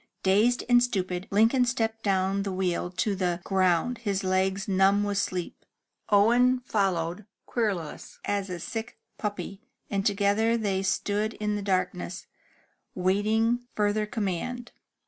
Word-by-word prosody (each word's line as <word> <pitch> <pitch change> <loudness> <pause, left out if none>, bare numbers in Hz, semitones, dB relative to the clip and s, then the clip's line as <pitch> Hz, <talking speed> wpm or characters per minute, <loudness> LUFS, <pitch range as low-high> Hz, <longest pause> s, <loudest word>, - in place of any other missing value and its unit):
*' - - -46
Dazed 210 +6 +3
and 245 0 +6
stupid, 185 -6 -1
Lincoln 225 +5 +4
stepped 225 -2 -1
down 195 -1 +1
the 195 0 -3
wheel 180 -2 -1
to 195 +3 -1
the 180 -2 -1
ground, 190 +5 +1
his 200 -4 -2
legs 190 +1 0
numb 195 +1 +3
with 205 -1 0
sleep. 180 -3 -3 0.5
Owen 240 +5 +4
followed, 190 -4 -1 0.2
querulous 195 -10 -3
as 200 -1 -1
a 180 -1 -4
sick 225 +6 -5 0.2
puppy, 205 -1 -4 0.3
and 195 -1 0
together 205 +3 +2
they 200 -4 0
stood 205 +3 -1
in 210 0 -2
the 205 - -3
darkness, 185 -1 -2 0.7
waiting 220 +6 +1
further 210 0 +1
command. 225 +4 -3
200 Hz, 135 wpm, -27 LUFS, 190-225 Hz, 0.7 s, and